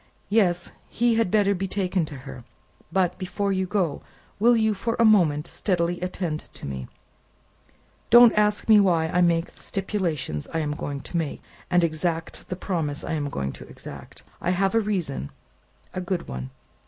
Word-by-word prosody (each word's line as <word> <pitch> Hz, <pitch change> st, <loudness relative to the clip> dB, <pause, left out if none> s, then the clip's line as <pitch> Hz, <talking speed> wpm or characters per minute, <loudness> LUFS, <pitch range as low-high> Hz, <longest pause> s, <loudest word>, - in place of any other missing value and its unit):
Yes; 180 Hz, -5 st, +2 dB, 0.2 s
he 240 Hz, 0 st, +2 dB
had 225 Hz, -4 st, +2 dB
better 200 Hz, 0 st, +3 dB
be 195 Hz, 0 st, -2 dB
taken 185 Hz, -3 st, 0 dB
to 150 Hz, -, -8 dB
her. 125 Hz, -3 st, -8 dB, 0.5 s
But, 185 Hz, -1 st, +1 dB
before 200 Hz, +1 st, -1 dB
you 190 Hz, 0 st, 0 dB
go, 180 Hz, -7 st, 0 dB, 0.4 s
will 240 Hz, +3 st, +5 dB
you, 220 Hz, -1 st, +2 dB
for 230 Hz, +4 st, -2 dB
a 230 Hz, -, +4 dB
moment, 165 Hz, -9 st, +4 dB
steadily 175 Hz, -3 st, -1 dB
attend 180 Hz, -4 st, -2 dB, 0.2 s
to -, -, -9 dB
me? 65 Hz, -2 st, -5 dB, 1.2 s
Don't 240 Hz, 0 st, +9 dB
ask 210 Hz, 0 st, +2 dB
me 215 Hz, -2 st, +8 dB
why 170 Hz, -5 st, +3 dB
I 180 Hz, -, +2 dB
make 170 Hz, -1 st, +2 dB
the -, -, -20 dB
stipulations 170 Hz, -, -2 dB
I -, -, +3 dB
am 150 Hz, -2 st, -1 dB
going 145 Hz, -1 st, -4 dB
to 175 Hz, -, -4 dB
make, 160 Hz, -4 st, -3 dB, 0.3 s
and 175 Hz, -1 st, +4 dB
exact 165 Hz, 0 st, -2 dB
the 180 Hz, -, -2 dB
promise 165 Hz, -6 st, -2 dB
I -, -, -3 dB
am 145 Hz, -2 st, -1 dB
going 70 Hz, -, -3 dB
to -, -, -11 dB
exact; -, -, -11 dB, 0.2 s
I -, -, -1 dB
have 190 Hz, +1 st, +1 dB
a 225 Hz, -, +4 dB
reason 180 Hz, -, -2 dB, 0.6 s
a 185 Hz, -, -3 dB
good 180 Hz, 0 st, -3 dB
one." 65 Hz, +1 st, -5 dB
180 Hz, 180 wpm, -25 LUFS, 155-200 Hz, 1.2 s, Don't